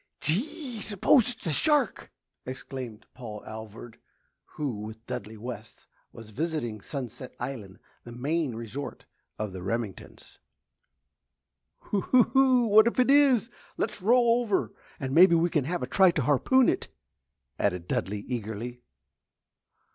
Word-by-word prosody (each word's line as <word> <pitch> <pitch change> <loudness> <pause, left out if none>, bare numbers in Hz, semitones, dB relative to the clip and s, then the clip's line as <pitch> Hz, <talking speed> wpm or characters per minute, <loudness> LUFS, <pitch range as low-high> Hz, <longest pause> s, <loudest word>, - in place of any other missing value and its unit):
"Gee! 250 - -2
S'pose 220 +5 +3
it's 240 - -8
a 165 - 0
shark?" 290 - +1 0.3
exclaimed 130 -3 -7
Paul 110 -5 -8
Alvord, 110 +1 -9 0.5
who, 140 -8 -4
with 110 +2 -9
Dudley 120 -3 -6
West, 115 -1 -9 0.3
was 115 -2 -12
visiting 120 -5 -3
Sunset 130 -1 -7
Island, 105 -8 -6 0.3
the 120 - -10
Maine 140 +2 -1
resort 115 +5 -7 0.3
of 105 -3 -4
the 95 - -7
Remingtons'. 105 +1 -5 1.5
"Oo 200 -3 +2 0.3
oh! 260 -2 +5
What 215 +2 +7
if 235 - 0
it 255 +2 +4
is? 265 -5 +4 0.3
Let's - - -2
row 240 +5 +4 0.2
over 210 -5 -1 0.3
and 135 -3 -3
maybe 170 +2 +7
we 170 +1 +2
can 150 -5 +1
have 175 +1 -2
a - - 0
try 190 +7 +5
to 160 -5 0
harpoon 230 - +4
it!" - - 0 0.7
added 90 -3 0
Dudley, 100 +2 -2
eagerly. 120 +1 -5
135 Hz, 130 wpm, -28 LUFS, -, 1.5 s, What